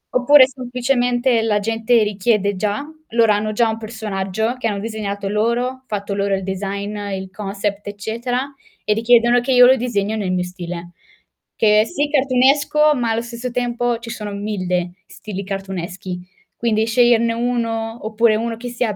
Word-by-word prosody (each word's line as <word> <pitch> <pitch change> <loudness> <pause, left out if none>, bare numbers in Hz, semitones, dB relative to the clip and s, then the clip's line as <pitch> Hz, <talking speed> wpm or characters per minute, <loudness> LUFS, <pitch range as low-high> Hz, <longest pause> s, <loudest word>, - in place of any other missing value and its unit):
Oppure 260 +2 +7
semplicemente 250 -1 0
la 220 -2 +1
gente 225 +2 +2
richiede 205 0 +1
già, 210 +7 -2 0.2
loro 230 -1 +3
hanno 210 +1 0
già 230 +2 +2
un 220 0 -3
personaggio 220 0 -3
che 230 - -1
hanno 205 -2 -2
disegnato 205 -2 -4
loro, 235 +5 0
fatto 200 -1 -3
loro 200 0 0
il 190 - -4
design, 200 +2 -4 0.2
il 190 0 -5
concept 200 0 -4
eccetera 230 +5 -3 0.4
e 210 - +3
richiedono 240 +2 +4
che 260 +2 0
io 250 0 +8
lo 260 +1 +7
disegno 220 -4 -1
nel 200 -4 -2
mio 180 -1 0
stile. 175 -1 -7 0.6
Che 210 -1 +4
è, - - 0
sì 290 +1 -2
cartoonesco, 280 +3 +3
ma 240 -3 -1
allo 225 +1 0
stesso 235 +1 -5
tempo 245 -1 -1
ci 230 0 -8
sono 210 -3 -5
1000 185 -4 -2 0.2
stili 200 -2 -7
cartooneschi, 190 -2 -5 0.4
quindi 220 -2 +1
sceglierne 235 0 +3
1 230 -1 -2
oppure 220 0 +3
1 230 +1 -2
che 245 +2 -7
sia 240 -3 -2
225 Hz, 160 wpm, -20 LUFS, 200-240 Hz, 0.6 s, io